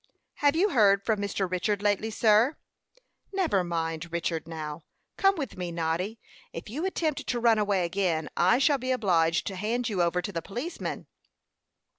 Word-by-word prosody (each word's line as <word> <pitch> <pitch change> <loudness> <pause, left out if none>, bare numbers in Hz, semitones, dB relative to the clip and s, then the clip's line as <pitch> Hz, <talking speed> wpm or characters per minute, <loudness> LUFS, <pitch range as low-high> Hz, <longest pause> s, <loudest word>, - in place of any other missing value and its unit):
"Have 290 +1 +3
you 385 +6 +3
heard 200 - +4
from 215 -3 +1
Mr. 200 -1 -1
Richard 200 +3 -1
lately, 205 +1 +1
sir?" 220 +5 +3 0.7
"Never 350 - +1
mind 165 -1 -3
Richard, 165 -1 -2
now. 155 -1 -6 0.3
Come 390 0 +3
with 285 - -5
me, 180 -1 -4
Noddy. 170 +6 -2 0.3
If - - -8
you 310 +10 -2
attempt 315 -6 -2
to 245 - 0
run 230 -2 +4
away 200 -4 +1
again, 170 -3 -1
I 185 +7 +4
shall 275 +1 +3
be 255 +1 -4
obliged 170 -9 +2
to 195 - -4
hand 230 +5 -1
you 195 -4 0
over 175 +1 +1
to 180 +1 -5
a 165 - -1
policeman." 245 - -5
200 Hz, 170 wpm, -27 LUFS, 170-245 Hz, 0.7 s, heard